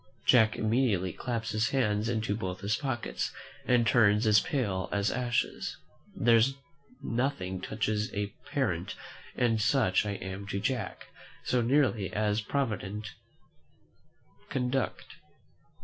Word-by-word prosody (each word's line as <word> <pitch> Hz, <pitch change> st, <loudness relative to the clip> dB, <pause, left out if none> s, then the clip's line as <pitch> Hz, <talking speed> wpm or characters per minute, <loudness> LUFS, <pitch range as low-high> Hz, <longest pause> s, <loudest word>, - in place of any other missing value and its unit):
Jack 110 Hz, -4 st, +5 dB
immediately 110 Hz, -6 st, +1 dB
claps 115 Hz, -2 st, -3 dB
his 110 Hz, +1 st, +1 dB
hands 110 Hz, -5 st, +1 dB
into 110 Hz, -3 st, 0 dB
both 95 Hz, -3 st, -5 dB, 0.2 s
pockets, 130 Hz, -5 st, -2 dB, 0.4 s
and 120 Hz, -2 st, +4 dB
turns 105 Hz, -1 st, +4 dB
as 105 Hz, -1 st, +6 dB
pale 100 Hz, -10 st, -1 dB
as 100 Hz, +1 st, +1 dB
ashes. 120 Hz, -1 st, -1 dB, 0.4 s
There 115 Hz, 0 st, +5 dB
is 130 Hz, +5 st, +3 dB, 0.5 s
nothing 115 Hz, -7 st, -1 dB
touches 110 Hz, +1 st, -1 dB
a 100 Hz, -1 st, -3 dB
parent, -, -, -1 dB, 0.4 s
and 115 Hz, -3 st, +2 dB
such 105 Hz, -5 st, +3 dB
I 100 Hz, -, -1 dB
am 95 Hz, 0 st, -6 dB
to 100 Hz, 0 st, -2 dB
Jack, 125 Hz, +1 st, -2 dB, 0.4 s
so 125 Hz, -, +1 dB
nearly 120 Hz, -5 st, +2 dB
as 105 Hz, 0 st, +1 dB
a -, -, -14 dB
provident 110 Hz, -6 st, -2 dB, 1.4 s
conduct. 130 Hz, -3 st, -1 dB
110 Hz, 120 wpm, -30 LUFS, 100-125 Hz, 1.4 s, as